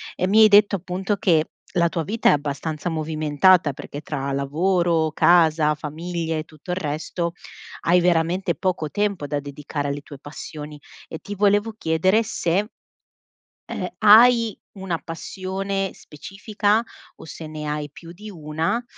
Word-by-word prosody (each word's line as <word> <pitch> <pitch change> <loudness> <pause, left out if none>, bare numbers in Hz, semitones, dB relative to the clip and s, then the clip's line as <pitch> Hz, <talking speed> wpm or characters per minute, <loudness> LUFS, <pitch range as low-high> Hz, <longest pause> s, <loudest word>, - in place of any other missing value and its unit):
Ehm, 185 - -1
mi 220 +2 +6
hai - - +9
detto, 205 -1 +5
appunto, 190 +3 -3
che 165 -7 +2 0.2
la 170 -2 +2
tua 165 0 -2
vita 220 +8 +1
è - - +6
abbastanza 150 +3 -2
movimentata 155 +1 +2
perché 145 - -8
tra 140 -2 -4
lavoro, 160 +3 +1
casa, 160 -3 +4
famiglie 160 +2 -4
e - - -4
tutto 155 +3 -10
il 180 - -2
resto 170 +2 -3 0.5
hai 175 +2 +4
veramente 175 0 +1
poco 175 -3 -2
tempo 200 -4 -1
da 145 -1 -2
dedicare 145 0 -5
alle 140 +1 -3
tue 145 -2 -12
passioni 150 +1 -9 0.3
e 160 - -7
ti 205 0 -7
volevo 205 +2 +2
chiedere 185 +7 +2
se 195 +1 -1 1.0
ehm, 180 - -3
hai 230 +1 +6 0.2
una 185 -3 -3
passione 190 +4 -4
specifica 205 +6 -2 0.4
o - - -12
se 160 0 -9
ne 155 -1 -6
hai 150 0 -3
più 165 +3 -12
di 210 +4 -10
1 160 +6 -2
170 Hz, 150 wpm, -22 LUFS, 150-195 Hz, 1.0 s, hai